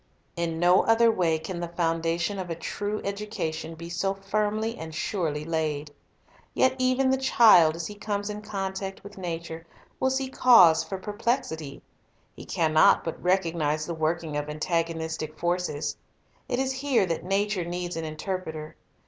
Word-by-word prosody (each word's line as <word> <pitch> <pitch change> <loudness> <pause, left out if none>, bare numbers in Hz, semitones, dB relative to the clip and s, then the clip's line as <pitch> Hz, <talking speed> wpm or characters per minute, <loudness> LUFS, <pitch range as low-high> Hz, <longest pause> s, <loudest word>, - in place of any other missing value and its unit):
In 170 -2 -2
no 180 +2 +5
other 225 0 +5
way 170 -6 +1
can 165 +3 -6
the 175 - -3
foundation 165 +2 -1
of 180 -2 -5
a 165 - -2
true 205 +5 -4
educa 200 -5 -3
tion 165 +1 -6
be 170 +1 -8
so 190 +3 -1
firmly 215 +3 -1
and 160 -7 -8
surely 160 -5 -2
laid. 155 -2 -2 0.6
Yet 260 0 +4
even 255 +1 +2
the 265 - +2
child, 215 -11 +6
as 165 -1 -4
he 210 - -6
comes 205 -1 -3
in 210 0 -5
contact 195 -2 -4
with 200 0 -11
nature, 165 -2 -5 0.4
will 260 - +2
see 265 0 -1
cause 205 -11 +6
for 195 - -5
perplexity. 205 - -3 0.5
He - - -10
can 160 -2 0
not 155 - +6
but 165 - -5
recognize 165 -5 +1
the 170 - -4
working 160 -1 -1
of 145 0 -3
antagonistic 160 0 -2
forces. 175 -2 -1 0.5
It 245 - 0
is 265 0 0
here 265 -5 +1
that 165 -3 -3
nature 195 0 0
needs 175 0 -4
an 165 - -3
interpreter. 160 -1 -5
175 Hz, 165 wpm, -26 LUFS, 160-205 Hz, 0.6 s, child